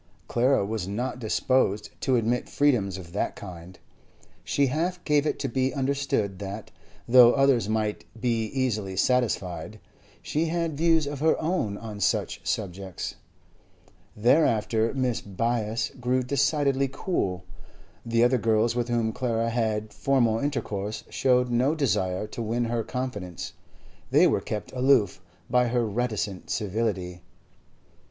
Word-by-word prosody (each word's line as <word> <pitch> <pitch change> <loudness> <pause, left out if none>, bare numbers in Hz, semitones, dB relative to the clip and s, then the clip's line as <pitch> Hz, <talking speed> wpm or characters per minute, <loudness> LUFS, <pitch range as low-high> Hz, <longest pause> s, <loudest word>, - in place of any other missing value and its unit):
Clara 125 -2 +2
was 105 -3 -3
not 125 +5 -3
disposed 110 -2 +1
to 130 - +2
admit 120 +1 0
freedoms 115 -10 +2
of 85 -3 -10
that 100 - -1
kind; 90 -2 -10 0.7
she 140 - +1
half 170 +7 -1
gave 150 0 +3
it - - -1
to 140 - -2
be 130 +1 0
understood 135 -8 -1
that, 100 +2 -6 0.4
though 120 0 +8
others 135 -6 +3
might 110 -1 -1
be 115 -2 0
easily 110 -6 -2
satisfied, 110 -4 0 0.4
she 155 +2 0
had 165 -1 -1
views 160 0 +3
of 145 -1 -5
her 160 +2 +3
own 155 - -1
on 105 -2 -7
such 100 - 0
subjects. 95 -2 -4 1.0
Thereafter 115 -2 +3
Mrs. 125 -7 -2
Byass 115 -1 0
grew 125 +1 +1
decidedly 140 0 +1
cool. 95 - -2 0.6
The 115 0 +2
other 125 +1 +3
girls 115 +1 +2
with 120 -1 0
whom 115 -2 0
Clara 115 -2 -1
had 110 -2 -1
formal 120 -3 +2
intercourse 110 -7 -3
showed 125 -1 +2
no 130 +6 +2
desire 95 - 0
to 110 +2 -7
win 115 +2 -1
her 115 0 -1
confidence; 105 -10 -5 0.6
they - - +5
were - - +2
kept 105 - -5
aloof 125 -8 +2 0.3
by 125 0 +3
her 120 0 +1
reticent 105 -3 -2
civility. 95 -4 -2
115 Hz, 135 wpm, -26 LUFS, 105-130 Hz, 1.0 s, though